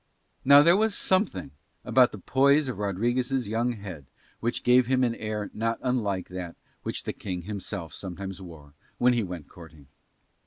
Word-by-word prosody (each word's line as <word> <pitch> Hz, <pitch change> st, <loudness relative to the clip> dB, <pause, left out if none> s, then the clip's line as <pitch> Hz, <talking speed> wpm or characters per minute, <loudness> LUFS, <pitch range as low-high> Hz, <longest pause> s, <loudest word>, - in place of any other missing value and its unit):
Now 140 Hz, +2 st, +8 dB
there 170 Hz, +3 st, +6 dB
was 215 Hz, 0 st, +1 dB
something 185 Hz, -, 0 dB, 0.3 s
about -, -, +5 dB
the -, -, -8 dB
poise 140 Hz, +2 st, +3 dB
of 125 Hz, -6 st, -4 dB
Rodriguez' 120 Hz, +5 st, 0 dB
young 115 Hz, +3 st, 0 dB
head 95 Hz, -, -9 dB, 0.3 s
which 120 Hz, +1 st, -2 dB
gave 125 Hz, 0 st, +5 dB
him 130 Hz, 0 st, +2 dB
an 120 Hz, -2 st, +2 dB
air 105 Hz, -2 st, -4 dB
not 115 Hz, +1 st, -1 dB
unlike 105 Hz, -8 st, -1 dB
that 90 Hz, -2 st, -6 dB, 0.3 s
which -, -, -4 dB
the -, -, -3 dB
King 90 Hz, -3 st, -5 dB
himself 100 Hz, -3 st, -5 dB
sometimes 95 Hz, 0 st, -6 dB
wore 80 Hz, -5 st, -12 dB, 0.2 s
when 125 Hz, 0 st, +4 dB
he 120 Hz, -, +1 dB
went 90 Hz, -6 st, -6 dB
courting. 80 Hz, -5 st, -15 dB
110 Hz, 165 wpm, -27 LUFS, 90-125 Hz, 0.3 s, Now